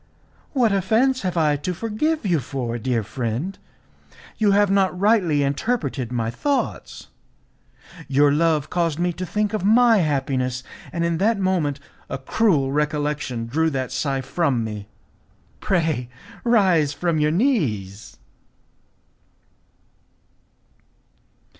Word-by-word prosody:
"What 245 -6 +3
offence 225 +7 +2
have 180 -2 -2
I 150 -2 +3
to 180 +5 -4
forgive 230 - -1
you 175 -5 +2
for, 125 -2 -4
dear 120 -2 -1
friend? 125 - -3 0.8
You 215 -2 +3
have 200 0 +3
not 190 -2 +2
rightly 190 -8 +3
interpreted 140 - -2
my 115 -2 -1
thoughts. 280 - -3 1.0
Your 140 +1 +4
love 155 -1 +1
caused 170 -4 0
me 175 0 0
to 180 +2 -5
think 210 +3 -1
of 215 - -2
my 225 +2 +5
happiness, 135 -6 -1 0.3
and 170 -1 -1
in 170 -1 -1
that 220 +2 +2
moment 175 -7 0 0.3
a - - -3
cruel 140 -1 +1
recollection 150 -4 -1
drew 160 +7 +1
that 130 -4 -3
sigh 135 -2 -1
from 135 -4 0
me. 105 -2 -6 0.7
Pray 160 -9 0 0.3
rise 185 -11 +3
from 165 +2 -1
your 150 0 +2
knees." 140 - -1
160 Hz, 120 wpm, -22 LUFS, 135-195 Hz, 1.0 s, my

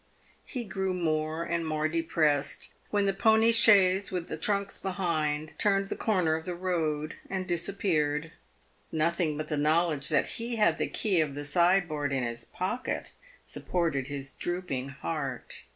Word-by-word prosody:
He 250 -3 -5
grew 190 -3 -2
more 155 -1 -1
and 170 0 -1
more 155 -1 0
depressed 155 -3 0 0.2
when 205 -1 +1
the 195 - +2
pony 220 +3 +4
chaise, 200 -4 +5
with 180 -2 -3
the - - -2
trunks 200 +4 -1
behind, 155 -5 -1
turned 195 -1 +2
the - - -2
corner 185 -7 +1
of 160 0 -2
the 180 - -3
road 160 -4 -1
and 190 -1 -2
disappeared. 165 -4 0 0.6
Nothing 160 -1 0
but 155 0 -4
the 150 - -2
knowledge 155 -1 +2
that 150 -3 +3
he 235 +1 -3
had 190 -7 +3
the - - +1
key 190 -6 +2
of 145 -3 -2
the 145 0 -4
sideboard 170 -3 +2
in 135 -2 0
his 115 -1 -4
pocket 240 +8 -3 0.3
supported 160 -7 -1
his 140 -1 -4
drooping 175 -7 -3
heart. 135 -2 -4
165 Hz, 155 wpm, -29 LUFS, 150-190 Hz, 0.6 s, chaise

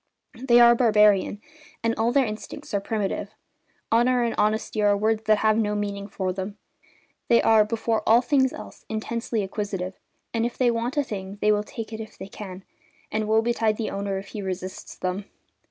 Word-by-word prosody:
They 240 0 +3
are 235 0 +8
barbarian, 210 -4 +4 0.4
and 230 0 +2
all 230 +1 +1
their 270 0 +3
instincts 215 -1 -7
are 200 - +2
primitive. 205 0 -3 0.6
Honour 240 +2 +3
and 230 -1 0
honesty 215 +1 0
are 205 -1 +4
words 220 +1 0
that 215 0 +4
have 215 +1 +2
no 210 -1 0
meaning 200 -1 -3
for 190 -2 -3
them; 195 +2 -5 0.7
they 235 - +5
are, 220 -1 +5
before 225 +1 -1
all 230 +2 +7
things 265 -1 +3
else, - - -10
intensely 225 0 -2
acquisitive, 195 -2 -4 0.4
and 230 -1 0
if 240 0 -2
they 245 -2 +3
want 235 +4 -2
a 290 - +3
thing 200 -5 -6
they 210 - +3
will 210 0 +2
take 225 +1 -7
it 220 - -5
if 220 -1 -9
they 190 - -8
can, 190 -2 -9 0.5
and 215 0 -1
woe 220 +1 +3
betide 225 -2 +1
the 225 - -3
owner 195 0 -2
if 195 +1 -7
he 210 - -6
resists 185 -1 -6
them. 185 +2 -3
215 Hz, 190 wpm, -25 LUFS, 200-230 Hz, 0.7 s, are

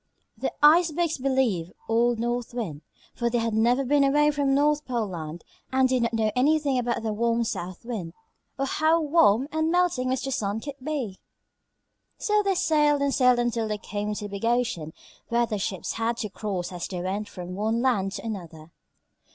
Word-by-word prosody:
The - - -2
Icebergs 330 0 +4
believed 250 -10 0
old 235 +1 +2
North 240 +1 -2
Wind, 165 -12 -4 0.3
for 235 -1 -1
they 240 - 0
had 230 -1 -1
never 240 +5 +2
been 285 +2 +3
away 295 +2 +4
from 280 -2 +1
North 295 +1 +2
Pole 240 -5 -1
Land 165 -1 -6 0.3
and 260 0 +4
did 255 -1 +1
not 235 0 0
know 220 -1 +1
anything 285 0 +2
about 235 -2 -1
the 220 -1 -1
warm 235 +2 +1
South 185 -2 -5
Wind, 200 -9 -5 0.4
or 275 - 0
how 315 +4 +2
warm 280 -6 +3
and 315 0 0
melting 350 -8 +2
Mr. 260 +1 -1
Sun 210 -2 -2
could 285 -1 -8
be. 260 -10 -3 1.0
So 420 0 +2
they 395 -2 +1
sailed 295 -4 +3
and 280 -1 +1
sailed 250 -2 +4
until 235 -2 0
they 210 0 -2
came 210 0 -4
to 210 - -5
the - - -6
big 200 +1 -7
ocean 235 -10 0 0.4
where 235 0 +2
the 215 -3 -3
ships 190 -2 -3
had 230 +1 -1
to 215 -3 -3
cross 195 -3 -4
as 175 -1 -5
they 185 -2 -5
went 195 +4 -3
from 180 -1 -7
one 220 +5 0
land 200 -7 +1
to 205 +1 -6
another. 170 -7 -7
235 Hz, 190 wpm, -26 LUFS, 205-275 Hz, 1.0 s, Icebergs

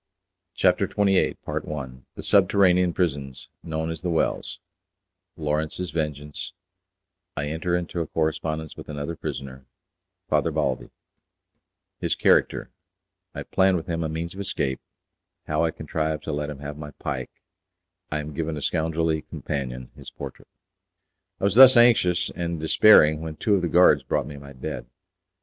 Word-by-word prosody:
CHAPTER - - +3
XXVIII 100 -2 +2 0.8
The - - -7
Subterranean 90 -2 +4
Prisons 70 -7 -2
Known 80 0 -3
as 80 -2 -5
the 90 - -2
Wells 85 +2 -1 0.8
Lawrence's 80 +2 -2
Vengeance 75 -2 -4 0.8
I 70 - -1
Enter 85 +3 -1
into 85 0 -3
a 80 - -3
Correspondence 80 0 -2
With - - -11
Another 75 +2 -4
Prisoner, 65 -3 -7 0.6
Father - - +2
Balbi: - - -1 1.1
His - - 0
Character - - +2 0.6
I - - -4
Plan 95 0 +3
With 80 -2 -3
Him 85 -1 -2
a 80 - -2
Means 80 +2 -4
of 95 - -10
Escape 70 -9 -2 0.7
How 75 +1 0
I - - +1
Contrived 80 -1 -3
to - - -4
Let 75 0 -2
Him 75 - -6
Have 75 +1 -7
My 75 -1 -7
Pike 65 -2 -4 0.8
I 75 - -1
Am 75 0 -7
Given 80 0 -3
a - - -5
Scoundrelly 80 0 0
Companion 65 -5 -5
His - - -10
Portrait. - - -9 0.9
I - - -10
was 100 -1 +3
thus 130 +2 +9
anxious 90 -7 +4
and 85 -1 -3
despairing 80 -2 +6
when 80 -1 -5
two 105 - +1
of 100 - +3
the 90 - 0
guards 90 +2 +6
brought - - -1
me 70 - -8
my 70 0 -11
bed. 65 -2 -6
80 Hz, 150 wpm, -25 LUFS, 75-90 Hz, 1.1 s, thus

